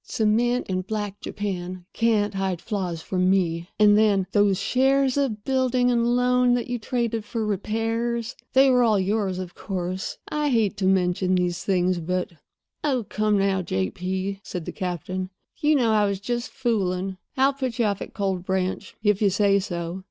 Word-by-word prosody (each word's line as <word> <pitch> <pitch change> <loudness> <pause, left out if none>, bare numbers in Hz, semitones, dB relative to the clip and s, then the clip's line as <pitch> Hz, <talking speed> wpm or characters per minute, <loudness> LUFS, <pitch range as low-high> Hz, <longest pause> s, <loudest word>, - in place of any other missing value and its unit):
Cement 235 +3 +1
and 185 0 -2
black 205 -2 -3
Japan 185 -3 -4
can't 215 -3 +2
hide 190 -3 -1
flaws 180 -4 -3
from 185 -1 +1
me. 170 -3 +1
And 210 -1 +6
then, 205 -3 +3
those 205 -2 +3
shares 270 +1 +2
of 250 -7 -1
building 255 -1 +2
and 240 0 +2
loan 250 0 +3
that 245 - -1
you 245 -1 -2
traded 230 -1 -1
for 220 +1 -3
repairs—they 225 +5 0
were 250 -1 +4
all 220 -4 +3
yours, 195 -1 0
of 185 -1 -6
course. 185 -1 -4
I 300 -1 -1
hate 220 -5 +2
to 190 -2 0
mention 185 0 +2
these 180 -1 -1
things, 180 -2 +1
but—" 180 +2 -2 0.5
"Oh, 260 -7 0
come 215 -1 +1
now, 195 -1 +1
J. 95 - -1
P.," 190 +2 -3
said 180 -4 -6
the - - -4
captain. 185 0 -4 0.3
"You 300 +1 +3
know 240 -5 +3
I 210 -1 +3
was 200 -1 -2
just 240 +3 -3
fooling. 195 -7 -1 0.2
I'll 270 +1 +4
put 260 -4 -3
you 235 - +2
off 200 -2 -1
at - - -8
Cold 190 -3 -1
Branch, 190 0 -2
if 210 -1 +2
you 205 - +4
say 200 +1 +3
so." 175 -1 -4
205 Hz, 175 wpm, -24 LUFS, 185-235 Hz, 0.5 s, And